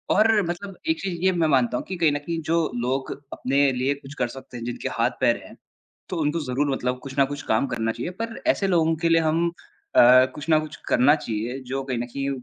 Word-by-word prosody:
और 215 0 +4
मतलब 190 +2 -5
एक 320 - +1
चीज़ 175 -3 -3
ये 190 - +5
मैं 170 -3 +1
मानता 130 -4 +2
हूँ - - -5
कि 190 - -5
कहीं 165 -3 +3
न 145 - 0
कहीं 165 +3 -4
जो 165 - +3 0.2
लोग 130 +2 -1 0.2
अपने 140 +1 +2
लिए 130 +2 0
कुछ 140 0 -12
कर 125 -2 0
सकते 125 0 -10
हैं, 115 - -7
जिनके 120 - -4
हाथ-पैर - - +1
हैं, - - -13 0.5
तो 180 - -4
उनको 150 +2 0
ज़रूर 140 +2 0
मतलब 125 -1 -1
कुछ 135 0 -8
न 140 - +6
कुछ 145 0 -6
काम 110 - +2
करना 115 -3 -1
चाहिए। 175 - -5
पर 230 0 -3
ऐसे 310 -11 +2
लोगों 165 -3 +3
के - - +5
लिए 165 0 +4
हम 160 +2 +1 0.5
अ, - - +9 0.3
कुछ 150 +1 -8
ना 155 -1 +5
कुछ 155 0 -5
करना 130 +4 +5
चाहिए 115 -2 -4
जो 135 0 -1
कहीं 130 -2 -2
न 120 - -3
कहीं 135 +3 -4
145 Hz, 235 wpm, -24 LUFS, 130-165 Hz, 0.5 s, अ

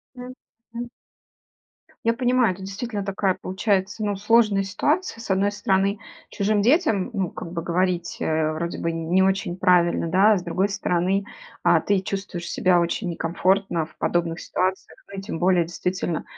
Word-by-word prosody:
Мгм. 240 -1 -10 1.2
Я 230 - +4
понимаю, 245 -3 +2
это 185 - -12
действительно 205 +2 -4
такая, 195 -1 0
получается, 200 +2 -1
ну, 205 - 0
сложная 210 -1 +3
ситуация: 290 - -1
с 230 - -9
одной 195 +1 +2
стороны, 200 -1 0 0.3
чужим 205 +1 +1
детям, 235 - +2
ну, 190 -5 -1
как 165 - -8
бы 170 -1 -3
говорить, 175 +1 -1
э, 155 0 +1
вроде 170 +2 -4
бы 165 0 -1
не 165 +3 +1
очень 190 -2 0
правильно, 175 -2 +3
да, 195 +5 +5
а 205 - +4
с 180 - -5
другой 185 +3 0
стороны, 195 0 0 0.4
а, - - +4
ты 200 -1 +1
чувствуешь 190 -3 -5
себя 180 -1 +3
очень 175 +3 -1
некомфортно 175 +1 0
в 160 - -21
подобных 170 -1 -1
ситуациях, 185 +1 -2
ну, 195 - -6
и - - -6
тем 195 -4 -5
более, 180 -1 +3
действительно, 175 0 -3
190 Hz, 160 wpm, -23 LUFS, 175-205 Hz, 1.2 s, да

